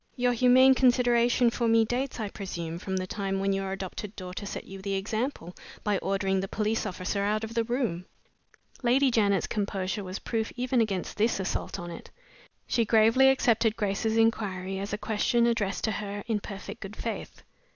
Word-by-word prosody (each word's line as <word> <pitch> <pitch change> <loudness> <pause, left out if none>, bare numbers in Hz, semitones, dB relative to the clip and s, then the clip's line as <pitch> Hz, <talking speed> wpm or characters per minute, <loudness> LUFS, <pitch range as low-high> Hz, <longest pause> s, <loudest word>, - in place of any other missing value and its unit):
Your 245 -1 +2
humane 255 +2 +6
consideration 245 -2 +3
for 235 0 0
me 225 0 +4
dates, 250 +3 -2
I 215 -2 -2
presume, 170 -4 -5
from 190 +1 -3
the 185 - -2
time 195 0 -2
when 195 0 +1
your 195 0 -2
adopted 195 +2 -6
daughter 185 +2 -6
set - - -5
you 195 0 -10
the 195 0 -2
example, 215 - -3 0.3
by 205 -3 +1
ordering 195 -1 0
the 195 - -2
police 215 +2 -1
officer 185 +1 -3
out 210 +2 0
of 220 +1 -5
the 230 0 +1
room?" 225 -7 -2 0.7
Lady 260 +2 +3
Janet's 200 -4 +2
composure 200 -1 -2
was 185 +1 -5
proof 225 -1 -2
even 250 -1 +1
against 195 -5 -2
this 220 0 +2
assault 190 - -3
on 175 0 -6
it. 170 - -9 0.6
She 235 - +1
gravely 225 +4 +5
accepted 230 -4 +3
Grace's 220 +1 0
inquiry 195 -4 0
as 200 +1 -4
a 210 - -1
question 225 +2 +1
addressed 220 -5 0
to 220 - +1
her 205 -1 -4
in 220 -2 0
perfect 200 -1 -8
good 195 +2 -7
faith. 230 - -6
210 Hz, 180 wpm, -28 LUFS, 195-235 Hz, 0.7 s, humane